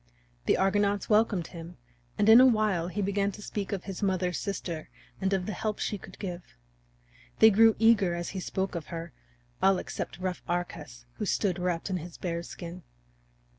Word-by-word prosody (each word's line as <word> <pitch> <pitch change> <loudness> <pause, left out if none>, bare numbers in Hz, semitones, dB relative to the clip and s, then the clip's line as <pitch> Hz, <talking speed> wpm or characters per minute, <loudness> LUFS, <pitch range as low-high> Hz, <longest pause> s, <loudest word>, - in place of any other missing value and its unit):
The - - +4
Argonauts 200 +2 +1
welcomed 210 -5 +3
him, 170 -1 -9 0.4
and 205 - +2
in 225 +3 +10
a - - +8
while 215 -8 +2
he 200 +3 -2
began 200 +1 0
to 210 - -10
speak 200 -1 -4
of 195 -3 -3
his 195 0 -6
mother's 185 -3 0
sister 175 -5 -4 0.3
and 190 0 +1
of 190 -2 0
the 215 - -3
help 210 +3 -2
she 205 - -2
could 185 - -12
give. 180 -3 -5 1.0
They 220 0 +8
grew 225 +2 +6
eager 215 -6 +4
as 175 0 -4
he 190 - -5
spoke 190 +1 -2
of 170 -3 -5
her, 165 -3 -6 0.5
all 190 0 +5
except - - -5
rough 185 0 -3
Arcas, 155 -8 -4
who 210 - -2
stood 185 -1 0
wrapped 180 +1 -1
in 185 - 0
his 170 0 -8
bear's 170 -1 -4
skin. 175 +1 -8
190 Hz, 185 wpm, -29 LUFS, 175-205 Hz, 1.0 s, in